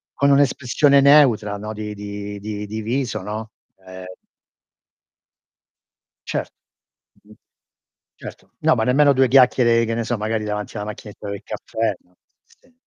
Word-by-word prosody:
con 140 Hz, 0 st, +2 dB
un'espressione 140 Hz, 0 st, +3 dB
neutra 125 Hz, -8 st, +4 dB
no, 105 Hz, +2 st, -6 dB
di 105 Hz, 0 st, -6 dB
di 100 Hz, 0 st, -7 dB
di 105 Hz, 0 st, -6 dB
di 110 Hz, +1 st, -5 dB
viso, 120 Hz, -2 st, -2 dB
no, 110 Hz, +2 st, -6 dB, 0.3 s
ehm 95 Hz, 0 st, -10 dB, 2.2 s
Cer -, -, -3 dB, 0.8 s
mh-mh. -, -, -18 dB, 0.8 s
Certo. -, -, -12 dB
No, -, -, +3 dB
ma 110 Hz, -, 0 dB
nemmeno 140 Hz, +3 st, +4 dB
2 130 Hz, 0 st, +3 dB
chiacchiere, 120 Hz, -2 st, +4 dB
che 115 Hz, -, -2 dB
ne 115 Hz, -, -2 dB
so, 120 Hz, -1 st, -2 dB
magari 110 Hz, +1 st, -2 dB
davanti 105 Hz, +1 st, -5 dB
alla 105 Hz, -, -4 dB
macchinetta 105 Hz, -1 st, -9 dB
del 100 Hz, -1 st, -6 dB
caffè, 110 Hz, -3 st, -3 dB
no 90 Hz, 0 st, -33 dB, 0.3 s
sì 255 Hz, -, -28 dB
110 Hz, 140 wpm, -21 LUFS, 105-130 Hz, 2.2 s, neutra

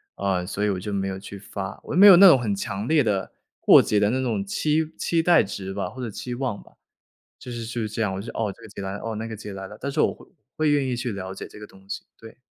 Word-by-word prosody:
啊， 95 Hz, -2 st, -1 dB
所 100 Hz, +2 st, -3 dB
以 105 Hz, -, +2 dB
我 95 Hz, -2 st, -1 dB
就 105 Hz, +3 st, -5 dB
没 95 Hz, -1 st, -1 dB
有 95 Hz, 0 st, -4 dB
去 100 Hz, +1 st, -9 dB
发。 95 Hz, -1 st, -7 dB
我 -, -, -6 dB
又 175 Hz, -, +2 dB
没 205 Hz, -, +10 dB
有 190 Hz, -3 st, +10 dB
那 195 Hz, +2 st, +10 dB
种 155 Hz, -7 st, +8 dB
很 105 Hz, -4 st, -1 dB
强 100 Hz, +2 st, -4 dB
烈 155 Hz, -2 st, +4 dB
的， 100 Hz, -4 st, -1 dB, 0.3 s
过 -, -, +7 dB
节 105 Hz, -, +1 dB
的 105 Hz, 0 st, +3 dB
那 130 Hz, +3 st, 0 dB
种 115 Hz, -6 st, -1 dB
期 155 Hz, +9 st, 0 dB
期 165 Hz, -1 st, +1 dB
待 170 Hz, 0 st, +5 dB
值 95 Hz, -1 st, -6 dB
吧， 95 Hz, -2 st, -3 dB
或 130 Hz, +7 st, -9 dB
者 120 Hz, -, -3 dB
期 125 Hz, +4 st, -6 dB
望 120 Hz, -4 st, -3 dB
吧， -, -, -20 dB, 0.7 s
就 125 Hz, -, -10 dB
是 120 Hz, -1 st, -5 dB
就 120 Hz, +1 st, -4 dB
是 110 Hz, -, -2 dB
这 110 Hz, +2 st, -6 dB
样。 105 Hz, -4 st, 0 dB
我 95 Hz, -, -4 dB
说， 115 Hz, -, -7 dB
“哦， 105 Hz, -3 st, -1 dB
这 -, -, -19 dB
个 -, -, -11 dB
节 -, -, -9 dB
来 95 Hz, 0 st, -4 dB
了。 100 Hz, -, -5 dB
哦， 115 Hz, -1 st, -3 dB
那 110 Hz, +1 st, -4 dB
个 110 Hz, -1 st, -6 dB
节 105 Hz, -1 st, -8 dB
来 95 Hz, 0 st, -7 dB
了。” 105 Hz, -, -11 dB
但 140 Hz, -, -3 dB
是 150 Hz, +2 st, -1 dB
我 -, -, +2 dB
会 -, -, -17 dB, 0.3 s
会 155 Hz, -1 st, +2 dB
愿 145 Hz, -2 st, +2 dB
意 125 Hz, -1 st, -1 dB
去 120 Hz, -1 st, -3 dB
了 95 Hz, -1 st, -6 dB
解 -, -, -7 dB
这 -, -, -13 dB
个 105 Hz, -, -9 dB
东 95 Hz, -1 st, -19 dB
西， 100 Hz, -, -5 dB
对。 115 Hz, +2 st, -14 dB
105 Hz, 330 characters per minute, -24 LUFS, 100-130 Hz, 0.7 s, 没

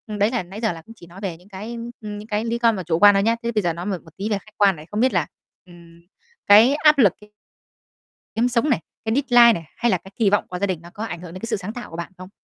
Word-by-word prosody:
Đấy 210 Hz, 0 st, 0 dB
là 240 Hz, -6 st, -1 dB
nãy 195 Hz, +5 st, -10 dB
giờ 220 Hz, -, +1 dB
là 165 Hz, -1 st, -8 dB
cũng 225 Hz, +8 st, -14 dB
chỉ 170 Hz, -, -15 dB
nói 175 Hz, +3 st, -13 dB
về 185 Hz, -5 st, -4 dB
những 180 Hz, +4 st, -21 dB
cái, 215 Hz, +4 st, -7 dB, 0.2 s
ưm, 210 Hz, -1 st, -6 dB
những 210 Hz, +1 st, -10 dB
cái 215 Hz, +1 st, -2 dB
lý 235 Hz, 0 st, -1 dB
con 230 Hz, -1 st, +3 dB
mà 185 Hz, -, -5 dB
chủ 160 Hz, 0 st, -1 dB
quan 205 Hz, +1 st, +7 dB
thôi 195 Hz, -, +2 dB
nhá. 230 Hz, +2 st, +2 dB
Thế 235 Hz, -, -1 dB
bây 215 Hz, -2 st, 0 dB
giờ 175 Hz, -3 st, 0 dB
nói 170 Hz, +2 st, -7 dB
một 195 Hz, -2 st, -2 dB
một 160 Hz, -, -18 dB
tí 200 Hz, +3 st, -3 dB
về 210 Hz, -, 0 dB
khách 215 Hz, +2 st, -16 dB
quan 200 Hz, -2 st, +4 dB
này, 150 Hz, -1 st, -12 dB
không 210 Hz, -, -2 dB
biết 255 Hz, +3 st, +2 dB
là, -, -, +1 dB, 0.4 s
ừm, 170 Hz, -1 st, -17 dB, 0.5 s
cái 220 Hz, +6 st, +7 dB
áp 300 Hz, 0 st, +4 dB
lực 210 Hz, -9 st, +5 dB
ấy 210 Hz, 0 st, -17 dB, 1.0 s
kiếm 230 Hz, +2 st, +2 dB
sống 240 Hz, +5 st, +1 dB
này, 255 Hz, -, +2 dB, 0.3 s
cái 220 Hz, +1 st, 0 dB
deadline 245 Hz, -4 st, +6 dB
này, 165 Hz, -, -14 dB
hay 235 Hz, -, +1 dB
là 185 Hz, -, +2 dB
cái 190 Hz, +3 st, -16 dB
kỳ 220 Hz, -4 st, +2 dB
vọng 205 Hz, -, +1 dB
của 180 Hz, -, -5 dB
gia 200 Hz, -, 0 dB
đình 180 Hz, -4 st, -3 dB
nó 170 Hz, -, -13 dB
có 210 Hz, -, -6 dB
ảnh 175 Hz, -6 st, -6 dB
hưởng 175 Hz, -2 st, -10 dB
đến 185 Hz, -, -8 dB
cái 230 Hz, -, -5 dB
sự 225 Hz, -2 st, -1 dB
sáng 195 Hz, +2 st, -7 dB
tạo 245 Hz, -, -8 dB
của 165 Hz, -, -9 dB
bạn 170 Hz, +3 st, -6 dB
không? 185 Hz, 0 st, -10 dB
205 Hz, 320 wpm, -22 LUFS, 180-230 Hz, 1.0 s, quan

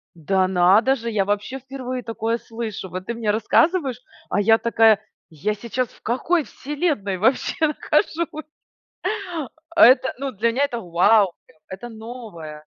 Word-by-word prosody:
Да 185 Hz, +3 st, +1 dB
надо 190 Hz, +8 st, +4 dB
же, 235 Hz, -3 st, -5 dB
я 200 Hz, -3 st, +1 dB
вообще 205 Hz, +6 st, -2 dB
впервые 255 Hz, -1 st, -6 dB
такое 230 Hz, 0 st, -2 dB
слышу. 225 Hz, -6 st, -6 dB
Вот 185 Hz, +1 st, -6 dB
ты 235 Hz, -, -3 dB
мне 225 Hz, -2 st, -1 dB
рассказываешь, 270 Hz, -, +2 dB, 0.3 s
а 205 Hz, -, 0 dB
я 225 Hz, +2 st, +5 dB
такая: 225 Hz, -2 st, +4 dB, 0.3 s
"Я 170 Hz, +7 st, -2 dB
сейчас 235 Hz, +3 st, -3 dB
в -, -, -22 dB
какой 310 Hz, +8 st, 0 dB
вселенной 280 Hz, -, -2 dB
вообще 265 Hz, -, +1 dB
нахожусь?" 315 Hz, +1 st, -1 dB, 1.3 s
Это 260 Hz, -1 st, +6 dB
ну 275 Hz, 0 st, -3 dB
для 230 Hz, +3 st, 0 dB
меня- 270 Hz, +4 st, +1 dB
это 240 Hz, -4 st, -3 dB
вау, 185 Hz, +2 st, +3 dB
прям, 155 Hz, -, -25 dB
это 195 Hz, +6 st, -8 dB
новое! 215 Hz, -10 st, -9 dB
225 Hz, 145 wpm, -22 LUFS, 200-260 Hz, 1.3 s, Это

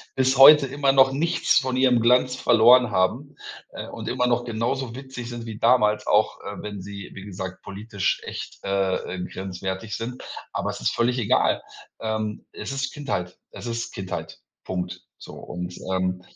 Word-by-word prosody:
bis 130 Hz, 0 st, +2 dB
heute 140 Hz, +1 st, +9 dB
immer 140 Hz, +1 st, +1 dB
noch 135 Hz, -1 st, +5 dB
nichts 160 Hz, +5 st, +2 dB
von 130 Hz, -2 st, -2 dB
ihrem 130 Hz, -2 st, +4 dB
Glanz 125 Hz, +2 st, +3 dB
verloren 120 Hz, 0 st, +5 dB
haben, 110 Hz, +10 st, 0 dB, 0.4 s
äh, -, -, -7 dB
und -, -, -6 dB
immer 125 Hz, -, +1 dB
noch 120 Hz, 0 st, +1 dB
genauso 120 Hz, +2 st, -2 dB
witzig 130 Hz, -2 st, -7 dB
sind 120 Hz, -1 st, -6 dB
wie 110 Hz, -2 st, -7 dB
damals, 105 Hz, -3 st, +3 dB
auch, -, -, +2 dB
äh, -, -, -7 dB
wenn 105 Hz, -2 st, -6 dB
sie, 100 Hz, +1 st, -8 dB
wie 95 Hz, -, -9 dB
gesagt, 95 Hz, -2 st, -7 dB
politisch 100 Hz, 0 st, -2 dB
echt, -, -, -7 dB
äh, 100 Hz, -1 st, +1 dB, 0.2 s
äh, 90 Hz, -, -4 dB
grenzwertig 95 Hz, +2 st, -5 dB
sind. 125 Hz, +2 st, -5 dB, 0.3 s
Aber -, -, -2 dB
es -, -, -8 dB
ist -, -, +1 dB
völlig 120 Hz, +2 st, +1 dB
egal. 110 Hz, -, +2 dB, 0.4 s
Ähm, 110 Hz, -1 st, -3 dB
es -, -, -6 dB
ist 135 Hz, 0 st, -2 dB
Kindheit. 100 Hz, -, -4 dB
Es -, -, -9 dB
ist 115 Hz, 0 st, -4 dB
Kindheit. 95 Hz, -2 st, -6 dB, 0.3 s
Punkt. 90 Hz, -1 st, -4 dB, 0.2 s
So -, -, -11 dB
und, 90 Hz, 0 st, -7 dB, 0.2 s
ähm 90 Hz, -1 st, -1 dB
115 Hz, 170 wpm, -24 LUFS, 95-130 Hz, 0.4 s, heute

